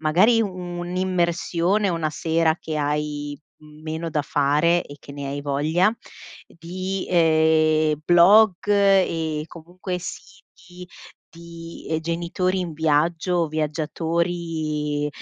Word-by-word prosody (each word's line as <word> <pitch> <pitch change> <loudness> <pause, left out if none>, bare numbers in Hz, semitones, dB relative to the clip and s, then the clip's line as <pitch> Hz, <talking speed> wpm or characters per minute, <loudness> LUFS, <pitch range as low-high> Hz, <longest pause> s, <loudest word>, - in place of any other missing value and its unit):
magari 185 +10 +4
un'immersione 180 0 -1
una 165 -3 -1
sera 160 0 +1
che 155 -1 -5
hai 145 0 -3 0.2
meno 155 +2 -7
da 150 -2 -1
fare 150 +5 +2
e 145 - -11
che - - -13
ne 140 0 -6
hai 140 +1 -4
voglia 150 +8 +1 0.5
di, 185 +3 -5
ehm, 155 -2 +3
blog 185 +4 +6
e 185 -6 +2
comunque 180 +2 -7
siti 180 0 -11 0.4
di, 170 0 -11
ehm, 160 - +1
genitori 175 +3 -1
in 170 -3 -4
viaggio, 160 +2 +1
viaggiatori 155 -1 -2
165 Hz, 105 wpm, -23 LUFS, 155-180 Hz, 0.5 s, blog